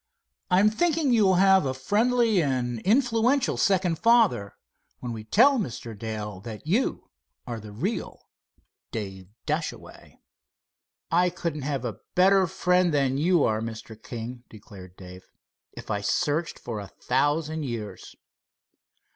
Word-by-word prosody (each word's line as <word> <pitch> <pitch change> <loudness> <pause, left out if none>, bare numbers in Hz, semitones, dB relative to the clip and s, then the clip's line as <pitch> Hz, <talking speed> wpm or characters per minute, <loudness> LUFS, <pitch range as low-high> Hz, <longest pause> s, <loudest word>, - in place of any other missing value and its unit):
I'm 195 +4 +4
thinking 320 0 +1
you'll 200 -5 +4
have 190 0 +5
a 130 -2 -2
friendly 220 - +2
and 125 -5 -1
influential 240 - +2
second 185 -4 +1
father, 230 - +3 0.4
when 120 -1 -5
we 110 -1 -7
tell 250 - +4
Mr. 120 - -5
Dale 105 -2 -5
that 110 +3 -9
you 205 +12 -1 0.3
are 120 -2 -5
the 105 -1 -11
real 175 - -4 0.6
Dave 95 -4 -6 0.2
Dashaway." - - -5 0.9
"I 180 +2 +3
couldn't 165 -4 -4
have 135 -2 -3
a 110 -4 -5 0.2
better 190 +1 +5
friend 180 +1 +2
than 135 -2 +1
you 170 0 +3
are, 110 0 +1
Mr. 110 0 -7
King," 120 +2 -8
declared 95 -4 -13
Dave, 90 0 -12 0.5
"if - - -8
I 100 -1 -1
searched 155 +9 -1
for 115 -3 -6
a 100 - -7
thousand 150 +7 -1
years." 115 -5 -7
145 Hz, 130 wpm, -26 LUFS, -, 0.9 s, have